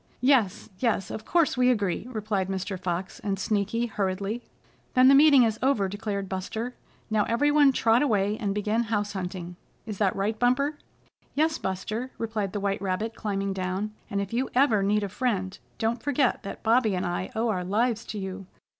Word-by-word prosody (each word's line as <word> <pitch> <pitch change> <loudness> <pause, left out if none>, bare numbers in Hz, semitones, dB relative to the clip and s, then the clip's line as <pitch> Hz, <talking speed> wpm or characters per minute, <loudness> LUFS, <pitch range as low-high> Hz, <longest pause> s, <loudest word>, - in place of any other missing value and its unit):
"Yes, 250 -7 +3
yes, 230 -6 0
of 215 - -6
course, 335 -6 +2
we 250 0 +4
agree," 210 -3 0
replied 215 -5 -2
Mr. 190 0 -3
Fox 180 +1 -3
and 195 -1 -2
Sneaky 210 +4 0
hurriedly. 200 +1 -2 0.5
"Then 255 +1 +7
the - - +7
meeting 280 -2 +7
is 220 -1 0
over," 255 -7 +2
declared 200 0 -3
Buster. 220 +6 -4 0.4
"Now 215 -1 +3
every 260 +6 +2
one 290 -2 +6
trot 230 -2 +3
away, 210 -7 +2
and 200 -3 -1
begin 215 +3 0
house 205 -2 -1
hunting. 180 -2 -5 0.3
Is 215 -3 -6
that 200 -3 +2
right, 210 +3 -1
Bumper?" 280 +5 +1 0.6
"Yes, 315 +2 +1
Buster," 215 +6 -3
replied 215 -4 -2
the 205 - -3
white 200 0 -1
rabbit, 200 +4 -2
climbing 200 -3 -2
down. 190 +3 -3 0.2
"And 200 - -1
if 200 +2 -4
you 255 +3 0
ever 245 -6 +4
need 205 +2 +2
a - - -1
friend, 195 -3 -2 0.2
don't 225 +1 -1
forget 280 -3 +1
that 195 - -8
Bobby 225 -3 +3
and 185 +1 -1
I 175 +1 -2
owe 225 +1 +1
our 185 -4 -1
lives 225 +4 0
to 215 - -6
you. 190 -1 -6
210 Hz, 185 wpm, -27 LUFS, 195-240 Hz, 0.6 s, Then